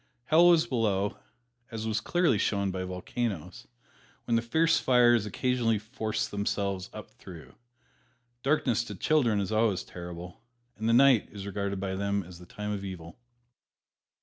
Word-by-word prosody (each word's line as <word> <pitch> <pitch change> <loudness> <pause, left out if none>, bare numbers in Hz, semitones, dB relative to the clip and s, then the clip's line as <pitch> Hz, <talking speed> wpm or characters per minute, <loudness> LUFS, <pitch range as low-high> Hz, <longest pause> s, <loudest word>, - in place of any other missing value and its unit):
Hell 160 +6 +5
was 170 -2 +5
below, 105 -5 -1 0.5
as 110 -1 -5
was 110 0 -1
clearly 170 - +2
shown 100 -1 0
by 95 0 -4
volcanoes, 95 0 -4 0.6
when 115 - +1
the 115 - +3
fierce 160 +8 +2
fires 120 -4 +4
occasionally 120 +1 0
forced 110 0 -3
themselves 100 -2 -2
up 110 -1 -10
through. 85 -5 -12 0.9
Darkness 135 -5 +1
to 105 - -7
children 120 -2 +2
is 100 0 -2
always 110 -4 +1
terrible, 90 +2 -9 0.3
and 110 +1 -2
the - - +4
night 130 -2 +5
is 100 -1 -8
regarded 100 -1 -3
by 95 0 -3
them 100 +1 -1
as 90 0 -12
the 90 - -13
time 105 +3 -5
of 100 -1 -4
evil. 90 -1 -8
105 Hz, 150 wpm, -28 LUFS, 95-120 Hz, 0.9 s, Hell